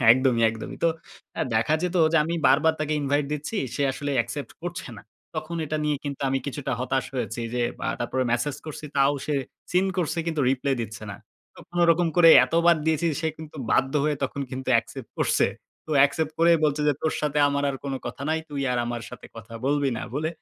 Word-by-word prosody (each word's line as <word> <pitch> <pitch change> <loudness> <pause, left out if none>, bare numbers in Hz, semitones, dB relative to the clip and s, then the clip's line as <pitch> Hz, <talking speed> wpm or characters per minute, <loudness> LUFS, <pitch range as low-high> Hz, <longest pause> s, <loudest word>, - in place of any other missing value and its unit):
একদমই, 125 -1 +4
একদমই। 110 0 -7
তো - - +6 0.5
আ - - 0
দেখা 115 +8 +2
যেত 180 0 -1 0.2
যে - - +4
আমি 165 +2 -2
বারবার 145 +5 +5
তাকে 155 0 -1
ইনভাইট 145 +1 +1
দিচ্ছি। 150 +9 -4 0.2
সে 145 - -1
আসলে 145 +2 -4
অ্যাকসেপ্ট 120 +2 -2
করছে 175 -4 -5
না। - - -11 0.3
তখন 155 +2 -4
এটা 155 - -2
নিয়ে 150 -1 +1
কিন্তু 140 -1 -5
আমি 135 0 +1
কিছুটা 140 -1 -3
হতাশ 130 +1 0
হয়েছি। 120 -2 -3
যে 125 - 0 0.3
আ - - 0
তারপরে 125 +2 -1
মেসেজ 135 +4 0
করছি, 155 0 -7
তাও 140 +1 +4
সে 150 - 0 0.4
সিন 180 +2 +3
করছে, 170 -1 -1
কিন্তু 160 -2 -1
রিপ্লে 135 +1 0
দিচ্ছে 110 -1 -6
না। 100 - -7 0.4
তো - - -18
কোনরকম 175 0 +3
করে 170 -2 +8 0.2
এতবার 170 +1 +3
দিয়েছি, 160 +1 +2
সে 160 - -1
কিন্তু 160 0 -10
বাধ্য 135 +1 +2
হয়ে 150 -1 +1
তখন 135 +1 -2
কিন্তু 130 0 -5
অ্যাকসেপ্ট 115 +1 -2
করছে। - - +3 0.4
তো - - -2
অ্যাকসেপ্ট 145 +3 +2
করে 170 +1 +5
বলছে 150 0 +1
যে - - +4
তোর 160 - +1
সাথে 150 0 0
আমার 140 0 -1
আর 135 - -4
কোন 140 -1 -2
কথা - - -6
নাই। 160 - +1
তুই 145 -2 -3
আর 125 - 0
আমার 120 -1 -4
সাথে - - -10
কথা 115 +1 -10
বলবি 145 0 +2
না, - - -4
বলে 155 +3 -1
145 Hz, 210 wpm, -25 LUFS, 130-160 Hz, 0.5 s, করে